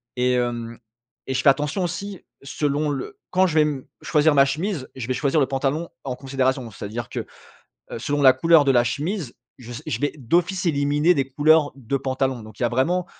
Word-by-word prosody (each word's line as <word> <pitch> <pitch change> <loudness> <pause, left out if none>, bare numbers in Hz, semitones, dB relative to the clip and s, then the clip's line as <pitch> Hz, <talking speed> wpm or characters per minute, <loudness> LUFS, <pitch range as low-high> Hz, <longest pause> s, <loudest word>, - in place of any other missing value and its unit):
et, 125 0 +1
hem 120 -1 -2 0.5
et 130 - -2
je 130 - +1
fais 140 - +6
attention 150 +7 +1
aussi, 190 +2 -5 0.2
selon 145 +2 -1
le 135 -2 -5
quand 185 +1 +4
je 160 - -3
vais, 155 -1 +5
mmh, 140 -3 -3 0.2
choisir 150 -1 +3
ma 140 0 +6
chemise, 155 +1 -3
je 125 -2 -5
vais 130 - 0
choisir 140 +4 +1
le 135 - +4
pantalon 140 +5 -1 0.2
en 125 -2 -3
considération. 130 -2 -1
C'est-à-dire 110 +4 -6
que, - - -4 0.7
heu, - - -5
selon 145 +4 -1
la 130 -2 +8
couleur 165 +3 +5
de 135 - +4
la 120 -2 +4
chemise, 155 - -3 0.2
je 120 -1 -11
s 115 - -7
je 155 - -3
vais 145 - -1
d'office 175 +8 0
éliminer 145 +2 +2
des 135 -3 -1
couleurs 150 +2 +4
de 135 +1 -2
pantalon. 130 -2 -2
Donc 110 -1 -13
il - - -1
y - - +4
a - - +1
vraiment, 170 +9 +1
140 Hz, 215 wpm, -23 LUFS, 130-155 Hz, 0.7 s, la